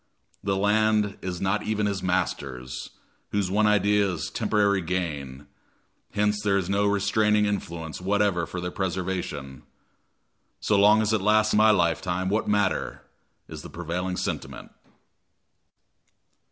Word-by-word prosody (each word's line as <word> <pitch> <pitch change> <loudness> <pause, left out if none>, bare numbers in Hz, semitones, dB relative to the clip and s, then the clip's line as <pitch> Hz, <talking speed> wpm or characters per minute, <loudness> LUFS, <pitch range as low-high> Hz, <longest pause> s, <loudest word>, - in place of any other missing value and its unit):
The 100 - 0
land 105 0 +2
is 90 -2 -4
not 95 +2 0
even 105 -1 -1
his 100 -2 -1
master's, 70 -9 -3 0.4
whose 100 -3 -1
one 105 +2 +3
idea 105 -1 +3
is 90 -3 -4
temporary 100 -2 +1
gain, 75 -6 -4 0.7
hence 105 0 +1
there 100 -1 +2
is 95 -3 -1
no 100 +1 +2
restraining 105 +1 +2
influence 85 -5 -4
whatever 100 -3 +1
for 90 - -5
their 90 0 -4
preservation. 90 -8 -4 1.0
"So 105 - +1
long 105 +2 +5
as 110 +1 0
it 110 - +1
lasts 110 +1 +3
my 110 +1 +5
lifetime, 90 -1 +1
what 105 +2 0
matter?" 105 -2 0 0.4
is - - -8
the - - -10
prevailing 90 +2 -4
sentiment. - - -5
100 Hz, 130 wpm, -25 LUFS, 90-105 Hz, 1.0 s, long